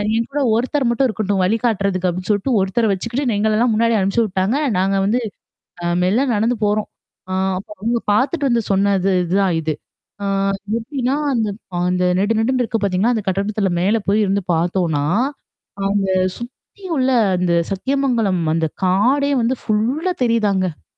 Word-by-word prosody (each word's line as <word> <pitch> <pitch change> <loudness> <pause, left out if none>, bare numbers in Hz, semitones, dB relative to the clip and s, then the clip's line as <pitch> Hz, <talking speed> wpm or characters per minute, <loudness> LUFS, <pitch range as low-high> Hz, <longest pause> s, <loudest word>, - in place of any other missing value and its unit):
என் 230 0 0
கூட 290 - -1
ஒருத்தர் 260 +2 0
மட்டும் 250 +3 +2
இருக்கட்டும். 205 -4 -1
வழிகாட்டுறதுக்கு 200 -3 0
அப்பிடின்னு 185 +3 -5
சொல்ட்டு, 205 +6 0
ஒருத்தர 200 +4 +1
வச்சுக்கிட்டு 235 +5 -2
எங்களெல்லாம் 220 +2 +2
முன்னாடி 230 +1 +2
அனுப்புச்சு 195 +4 +1
விட்டாங்க. 195 +5 0 0.2
நாங்க 195 +1 +1
வந்து, 240 +5 +1 0.6
அ - - -2 0.2
மெல்ல 215 +9 +2
நடந்து 225 +3 +1
போறோம். 210 +1 0 0.4
ஆ, - - -3 0.2
அப்பறம் 200 +1 -10
அவுங்க 235 +1 +1
பாத்துட்டு 275 +6 +1
வந்து 235 -1 +1
சொன்னது 195 -1 +2
இதுதான் 185 0 +1
இது. 155 -1 -1 0.5
ஆ - - -2 0.5
எப்பிடின்னா, 255 +3 -2 0.2
அந்த 225 -3 0 0.3
அ - - -1
அந்த 180 0 0 0.2
நெடு, 215 +3 +1
நெடுன்னு 255 +2 +1
இருக்கு 225 -2 -2
பாத்தீங்களா? 200 +5 +1
அந்த 215 - -2
கட்டிடத்தில 195 0 0
மேல 205 +5 +2
போயி 215 +2 +3
இருந்து 200 +1 0
பாத்தோன்னா, 165 -3 0 0.8
அங்க 200 -1 0 0.3
சுத்தி 255 - -12
உள்ள 260 0 +2 0.3
அந்த 180 -1 0 0.2
சத்தியமங்கலம் 230 -4 0
அந்த 165 -1 +1 0.2
காடே 255 +10 +2
வந்து 255 +3 +1
ஃபுல்லா 250 - 0
தெரியுதாங்க. 200 -8 0
215 Hz, 150 wpm, -19 LUFS, 190-240 Hz, 0.8 s, போயி